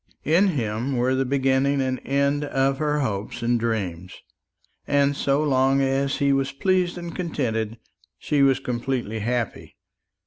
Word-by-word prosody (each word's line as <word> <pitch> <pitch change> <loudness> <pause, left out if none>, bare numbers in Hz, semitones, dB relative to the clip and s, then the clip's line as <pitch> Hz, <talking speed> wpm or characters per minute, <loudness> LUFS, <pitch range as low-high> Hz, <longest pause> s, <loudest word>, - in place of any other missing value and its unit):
In 170 +7 +4
him 125 - -1
were 125 +2 +2
the 135 0 +1
beginning 135 +1 +1
and 130 -1 -1
end 140 +1 +1
of 135 -1 0
her 150 -1 0
hopes 105 -3 -3
and 120 0 +2
dreams; 95 -7 -3 0.6
and 140 0 +2
so 140 +2 +1
long 135 -1 +3
as 135 +1 0
he 140 -2 +2
was 135 0 0
pleased 180 +3 0
and 170 -1 -7
contented, 115 -10 -2 0.4
she 145 -2 0
was 135 -1 +4
completely 120 -3 -3
happy. 120 +2 -3
135 Hz, 145 wpm, -24 LUFS, 120-140 Hz, 0.6 s, In